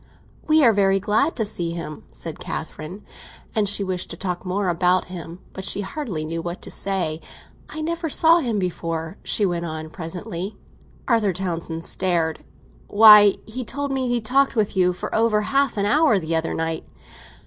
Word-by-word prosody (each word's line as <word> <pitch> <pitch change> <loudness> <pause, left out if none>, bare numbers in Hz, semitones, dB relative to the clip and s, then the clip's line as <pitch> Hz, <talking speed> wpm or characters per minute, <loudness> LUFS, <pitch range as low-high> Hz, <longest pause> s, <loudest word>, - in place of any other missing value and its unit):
"We 310 -1 +5
are 230 -3 +6
very 195 -1 +3
glad 220 - +1
to 220 - 0
see 170 -4 -1
him," 155 -3 -7
said - - -7
Catherine. 180 +7 -6 0.5
And 210 -3 +2
she 205 0 +2
wished 185 -2 -2
to - - -5
talk 180 -2 -4
more 190 +1 -1
about 180 +1 +2
him; 170 -1 -7 0.2
but 190 - -7
she 195 - 0
hardly 195 - -4
knew 165 +1 -3
what 175 +2 -5
to - - -5
say. 175 -5 -1 0.5
"I 310 - -5
never 330 +1 -2
saw 330 +3 +5
him 235 -8 -1
before," 165 -2 -3
she 210 - +2
went 175 -2 -1
on 155 -1 -6
presently. 175 +3 -6 0.5
Arthur 225 -6 +2
Townsend 170 -2 -4
stared. 170 -4 0 0.5
"Why, 210 -1 +8
he 250 +4 -5
told 285 +3 -4
me 260 -2 -1
he 245 0 +1
talked 270 +5 +1
with 215 -3 0
you 180 -1 +3
for 180 - -6
over 220 -1 +2
half 275 -1 +1
an 200 - +1
hour 290 0 +4
the 165 -2 -2
other 160 0 -1
night." 165 0 -2
195 Hz, 180 wpm, -22 LUFS, 170-225 Hz, 0.5 s, Why